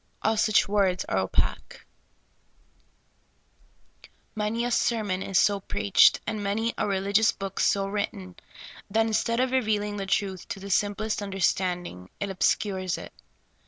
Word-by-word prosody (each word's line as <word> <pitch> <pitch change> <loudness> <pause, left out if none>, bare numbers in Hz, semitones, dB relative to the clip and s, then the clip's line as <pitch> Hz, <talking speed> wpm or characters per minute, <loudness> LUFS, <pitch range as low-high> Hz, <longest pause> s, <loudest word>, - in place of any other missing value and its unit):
All 220 +1 +2
such 215 -1 +3
words 195 -3 +1
are - - 0
opaque. - - -2 2.5
Many 215 +3 -1
a 245 - -2
sermon 215 -6 0
is 195 -1 -1
so 200 0 +3
preached, 205 0 +4
and 215 -1 -3
many 220 +4 -1
a - - -1
relig 200 +1 +1
ious 225 - +4
book 195 -1 -6
so 195 -1 +2
written, 195 -2 -4 0.5
that 225 +2 +2
instead 230 +1 0
of 255 0 +1
revealing 210 -5 0
the 195 -1 -4
truth 190 -2 -1
to - - -6
the 200 +1 -7
simplest 210 +2 0
understanding, 180 - -2
it 200 -1 -3
obscures 190 -1 0
it. - - -10
200 Hz, 140 wpm, -26 LUFS, 195-215 Hz, 2.5 s, preached